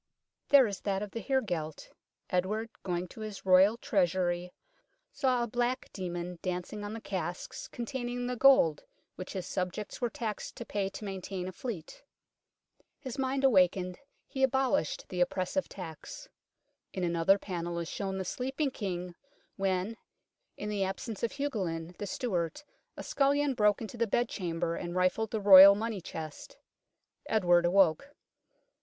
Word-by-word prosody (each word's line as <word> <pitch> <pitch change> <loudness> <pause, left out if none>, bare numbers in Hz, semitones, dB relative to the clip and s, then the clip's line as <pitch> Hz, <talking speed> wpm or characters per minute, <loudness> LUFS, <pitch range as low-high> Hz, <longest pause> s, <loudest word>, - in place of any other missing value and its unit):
There 280 -2 +8
is 200 -4 -4
that 195 0 -1
of 205 - -7
the 230 - -4
heregelt. 180 - -2 0.4
Edward, 210 +5 -1
going 180 -1 -2
to 220 - -11
his 215 -3 -7
Royal 190 +4 +6
Treasury, 180 -7 0 0.6
saw 255 - +1
a - - -2
black 245 +2 -1
demon 175 -2 -5
dancing 185 +3 -4
on 205 +1 -5
the 225 - -5
casks 180 -4 -5
containing 245 0 -4
the 250 0 -2
gold 245 - +5 0.3
which 185 - -7
his 190 -3 -4
subjects 185 +6 -4
were 240 - +1
taxed 220 -3 -5
to - - -7
pay 200 -1 -2
to 195 +2 -8
maintain 190 -1 -5
a - - -4
fleet. 185 -5 -7 0.9
His 265 0 -7
mind 270 +1 0
awakened, 185 -6 +3 0.3
he 265 - -5
abolished 265 - +1
the 180 -1 -2
oppressive 185 +9 0
tax. 180 - -9 0.7
In 185 - -3
another 170 +3 +3
panel 175 -3 -4
is 170 -1 -3
shown 195 +1 -3
the 190 - -3
sleeping 265 - -2
King 180 -6 -4 0.4
when, 195 +3 -1 0.6
in 210 - -4
the 205 -2 0
absence 195 +3 -4
of 235 - -1
Hugolin, 185 - -3
the 205 - -3
steward, 180 - -2 0.3
a - - -6
scullion 285 0 +2
broke 210 -3 +3
into 225 +2 -7
the 230 0 +1
bed 240 +4 +1
chamber 170 -3 -2
and 175 0 -5
rifled 185 +4 +1
the 220 - -2
Royal 200 -1 +10
money 215 -2 -3
chest. 160 - -8 0.7
Edward 175 -5 +4
awoke. 195 - +3
195 Hz, 150 wpm, -31 LUFS, 180-235 Hz, 0.9 s, Royal